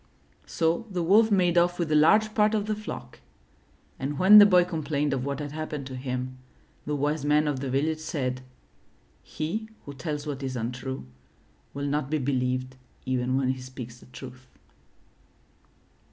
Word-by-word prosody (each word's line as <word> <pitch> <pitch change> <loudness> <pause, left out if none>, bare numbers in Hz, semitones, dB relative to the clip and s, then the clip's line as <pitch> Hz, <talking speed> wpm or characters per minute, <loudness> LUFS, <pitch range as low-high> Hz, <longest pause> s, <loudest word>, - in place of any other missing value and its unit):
So 170 +7 0
the 180 -3 -2
Wolf 215 +6 +5
made 180 -4 +3
off 175 +1 +1
with 170 -3 -2
a - - +3
large 215 +8 +4
part 215 0 +3
of 205 -1 0
the 215 - -1
flock, 215 0 -8 0.8
and 140 +2 -3
when 200 +5 +9
the 205 - +9
boy 180 -3 +5
complained 150 -4 -1
of 130 -1 -2
what 140 0 -3
had 145 -1 -5
happened 150 -2 -5
to 130 -1 -7
him, 130 0 -4 0.5
the 150 - -1
Wise 145 +1 -1
Man 150 +1 +3
of 145 -3 -1
the 135 0 -4
Village 155 +4 0
said: 130 -5 -3 0.8
He 210 +9 -4 0.2
who 145 - -7
tells 145 +2 -4
what 145 -2 -4
is 130 -1 -4
untrue, 125 - -4 0.7
will 140 0 -3
not 145 -1 -1
be 155 - +1
believed 130 -1 -1 0.3
even 130 0 0
when 135 -1 +1
he 130 0 -2
speaks 125 -2 -9
the - - -17
truth.'' 130 0 -11
145 Hz, 170 wpm, -27 LUFS, 130-170 Hz, 0.8 s, when